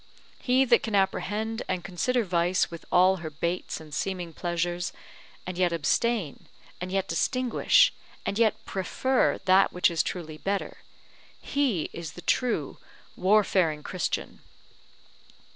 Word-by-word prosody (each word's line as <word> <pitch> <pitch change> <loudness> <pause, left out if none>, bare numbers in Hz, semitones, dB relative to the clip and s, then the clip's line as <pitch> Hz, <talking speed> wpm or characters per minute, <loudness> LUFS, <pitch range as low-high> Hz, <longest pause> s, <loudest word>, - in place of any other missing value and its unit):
He 260 +1 +3
that 240 -2 +4
can 220 -2 -2
apprehend 210 +3 0
and 185 -2 -2
consider 230 +7 0
vice 175 -1 +1
with 170 - -9
all 185 +1 +5
her 165 -3 -6
baits 170 +4 -3
and 155 -2 -12
seeming 180 -2 -3
pleasures, 175 +1 -2 0.5
and 180 0 -5
yet 180 -2 +3
abstain, 170 +3 0 0.3
and 180 0 -4
yet 195 0 0
distinguish, 250 +8 +3 0.3
and 200 - -2
yet 220 -3 +2
prefer 255 +7 0
that 190 +1 +5
which 180 0 +2
is 165 - +2
truly 155 -4 -5
better, 200 0 -2 0.6
he 265 - -1
is 170 -2 -7
the 175 - -10
true 250 -1 0 0.4
warfaring 185 -6 +2
Christian. 185 -3 -3
185 Hz, 130 wpm, -27 LUFS, 170-215 Hz, 0.6 s, all